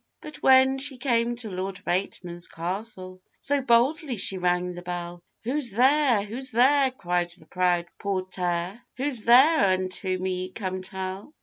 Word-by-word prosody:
But 305 0 -10
when 265 0 +4
she 270 -1 +1
came 240 -2 0
to 230 -3 -5
Lord 185 +1 -5
Bateman's 175 -1 -3
castle, 185 +1 -5 0.2
So 285 0 0
boldly 255 +2 +2
she 190 -1 +2
rang 180 0 0
the 175 - -8
bell; 175 0 -6 0.2
'Who's 255 +2 0
there? 260 -2 +3
who's 245 +6 -4
there?' 265 +3 +4
cried 175 -8 -2
the 160 - -18
proud 175 0 0
portèr, 185 0 -3 0.2
'Who's 260 -4 +1
there? 270 +7 +6
unto 185 0 -1
me 185 0 -3
come 185 -2 -5
tell. 190 +7 -6
195 Hz, 145 wpm, -25 LUFS, 185-255 Hz, 0.2 s, there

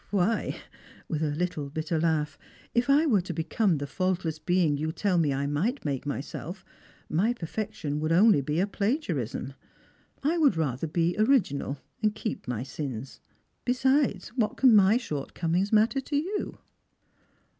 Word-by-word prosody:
Why," 205 +3 +1 0.5
with 155 -2 -2
a 155 - +1
little 150 -2 -2
bitter 155 +2 -2
laugh, 155 -3 0 0.4
"if 240 +2 +1
I 290 +3 +5
were 220 - +3
to 175 -2 -6
become 170 +2 +1
the 145 - -3
faultless 175 0 -1
being 170 -2 +2
you 155 +2 -2
tell 185 +1 +1
me 150 -4 +2
I 140 +1 -1
might 170 - -1
make 140 -1 -2
myself, 155 +6 -5 0.4
my 200 +10 +2
perfection 165 -7 -4
would 155 +1 -1
only 185 -2 +6
be 150 +4 -1
a 190 - +3
plagiarism. 200 - -2 0.7
I 325 +4 +2
would 285 - +4
rather 145 -1 -1
be 170 +2 0
original, 190 - +2 0.2
and 215 -1 +1
keep 215 - -4
my 125 -1 -2
sins. 135 -3 -6 0.4
Besides, 265 +3 +1
what 235 -4 -1
can 255 -4 +6
my 205 +2 +6
shortcomings 170 - -2
matter 225 +5 +3
to 285 - -4
you?" 370 +8 -2
175 Hz, 155 wpm, -28 LUFS, 150-220 Hz, 0.7 s, only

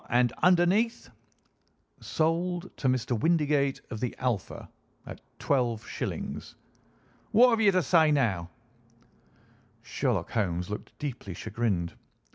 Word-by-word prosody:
And 120 0 +3
underneath?" 185 +6 +3 0.9
"'Sold 175 +3 -1
to 135 - -1
Mr. 130 -1 +1
Windigate 145 0 +1
of 110 - -4
the 125 0 -3
Alpha, 120 -7 -3 0.4
at - - -9 0.2
12_s_.'" 120 -5 -2 0.8
"What 245 +3 +6
have 225 -1 +2
you 205 -2 +6
to 185 -2 +2
say 160 +1 +4
now?" 100 - +1 1.3
Sherlock 120 - -1
Holmes 90 -4 -1
looked 105 - -7
deeply 120 -10 -6
chagrined. 100 -5 -2
130 Hz, 105 wpm, -28 LUFS, 110-170 Hz, 1.3 s, What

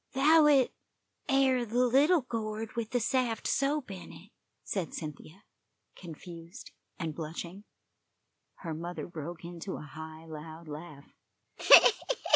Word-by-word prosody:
"'Thout 300 +3 +6
it 270 -4 +4 0.6
air 265 -2 +3
the 240 +2 +1
little 285 +7 +4
gourd 220 -2 -4
with 230 -2 -3
the 245 - 0
saft 240 -1 0
soap 275 -3 0
in 180 -3 -9
it," 205 +5 -14 0.3
said 190 -5 -3
Cynthia, 155 +3 -8 0.5
confused 170 0 -10 0.3
and 165 -3 -3
blushing. 170 +5 -7 1.0
Her 165 -3 -4
mother 170 +3 -5
broke 170 +1 -7
into 175 +2 -6
a - - -8
high, 160 +1 -10
loud 160 +1 -9
laugh. 150 -1 -10
185 Hz, 120 wpm, -30 LUFS, 165-250 Hz, 1.0 s, Thout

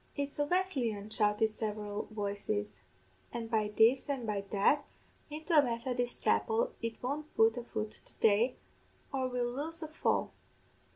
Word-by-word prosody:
'It's 285 0 -3
a 290 - +3
Wesleyan,' 260 - 0
shouted 215 +1 +2
several 210 -1 -3
voices; 205 0 -3 0.5
'an' 235 -1 -3
by 220 -2 +1
this 245 +6 +5
an' 270 -4 -1
by 210 -2 -1
that, 215 +8 +3 0.5
into 315 +3 -2
a 300 - +9
Methodist 245 -1 -2
chapel 470 +1 +2
it 230 +1 -4
won't 295 +4 -3
put 225 0 +5
a 245 - -4
foot 215 -2 -4
to - - -14
day, 225 +4 +3 0.6
or 260 -1 +1
we'll 245 -1 -1
lose 320 +5 -3
a - - -4
fall. 310 - 0
240 Hz, 155 wpm, -33 LUFS, 215-285 Hz, 0.6 s, a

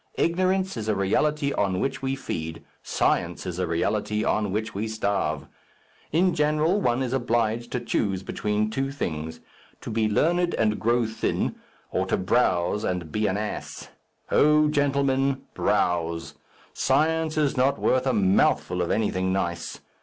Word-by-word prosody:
Ignorance 185 0 +1
is 110 -1 -4
a 105 - +2
reality 140 +9 +1
on 95 -2 0
which 135 - -2
we 135 0 -1
feed; 80 - -5 0.2
science 85 0 0
is 90 -1 -4
a 90 - 0
reality 105 +5 0
on 105 -2 0
which 110 +3 -2
we 105 +3 -2
starve. 100 -9 -1 0.7
In 175 +3 +3
general 155 +6 +2
one 120 -2 +1
is 130 -1 -2
obliged 120 -2 0
to 125 - 0
choose 100 -5 -1
between 105 +2 -1
two 135 +4 -1
things 80 - -4 0.4
to - - -6
be 110 -1 +1
learned 175 +10 +2
and 105 -1 +1
grow 120 +1 +2
thin, 110 0 -1 0.4
or - - 0
to - - +1
browse 95 -1 +1
and 90 -5 -2
be 105 +3 0
an 95 - 0
ass. 105 0 -5 0.4
O 150 0 +5
gentlemen, 140 -2 +1
browse! 85 -1 0 0.4
Science 155 +3 +1
is 150 -3 +2
not 130 +2 +2
worth 130 +1 +1
a - - +3
mouthful 95 -3 +2
of 85 - -1
anything 95 -4 0
nice. 85 -3 -3
110 Hz, 155 wpm, -25 LUFS, 95-140 Hz, 0.7 s, O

